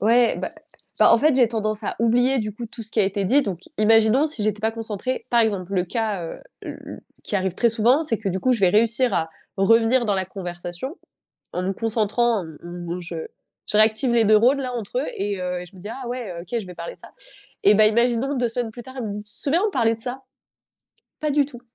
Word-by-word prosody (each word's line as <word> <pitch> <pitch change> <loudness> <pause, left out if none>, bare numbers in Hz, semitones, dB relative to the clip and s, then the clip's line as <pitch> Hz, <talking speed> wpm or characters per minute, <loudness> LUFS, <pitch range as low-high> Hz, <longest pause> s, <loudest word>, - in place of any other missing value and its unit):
Ouais, 235 +3 +4
bah - - -4 0.5
bah, - - +6
en - - +6
fait, 300 +4 +3
j'ai 255 -2 +5
tendance 215 -1 -2
à - - -2
oublier, 245 +3 +3
du 210 0 -4
coup, 235 +3 -7
tout 230 +1 -9
ce 220 - -10
qui - - -3
a - - +4
été 195 0 -1
dit, 275 +8 +4
donc 185 -6 -4 0.2
imaginons 225 +6 +4
si 270 -9 -1
j'étais 210 0 -1
pas 220 - +1
concentrée, 225 +2 -4
par 235 -1 +4
exemple, 200 -4 -1
le 180 -2 +1
cas, 210 -3 -2
heu, - - -7 0.2
l - - -7
l - - -8 0.2
qui 205 - -1
arrive 190 -2 -1
très 235 - +3
souvent, 235 +6 +3
c'est 265 -8 -1
que 210 -3 -3
du 190 0 -2
coup 255 - +2
je 230 - -1
vais 185 - +5
réussir 230 +5 +3
à 160 0 0 0.3
revenir 230 +5 +4
dans 205 -3 +1
la 190 -1 0
conversation 175 - -6 0.6
en 180 - -2
me 190 +1 -1
concentrant, 225 +2 +1
en - - -7
m 160 -2 -11
m 175 0 -6
je 175 -1 -7 0.5
je 210 - +1
réactive 220 +3 +5
les 230 - +4
neurones, 225 +6 +4
là, 255 -1 -3
entre 235 0 -4
eux 270 - -1
et 200 0 -2
heu 180 0 -3
et 180 - -8
je 185 - -17
me - - -12
dis: 205 - -7
«Ah 255 0 -6
ouais, 240 -6 -4
OK, 235 +7 -3
je 215 - -6
vais 180 - -9
parler 170 0 -7
de - - -24
ça» - - -13 0.5
et 205 - +7
bah, 215 +1 +6
imaginons 235 +4 +2
2 245 -3 0
semaines 230 0 -3
plus 240 +2 -10
tard, 260 +1 -12
il 245 - -3
me - - -4
dit: 210 +1 -6
«Tu 210 - -18
te - - -16
souviens 305 +5 +2
on - - -1
parlait 230 - +2
de 225 - -13
ça?». 255 +3 -5 1.0
Pas 305 -1 0
du 285 0 +3
tout, 245 -4 -12
225 Hz, 260 wpm, -23 LUFS, 195-245 Hz, 1.0 s, et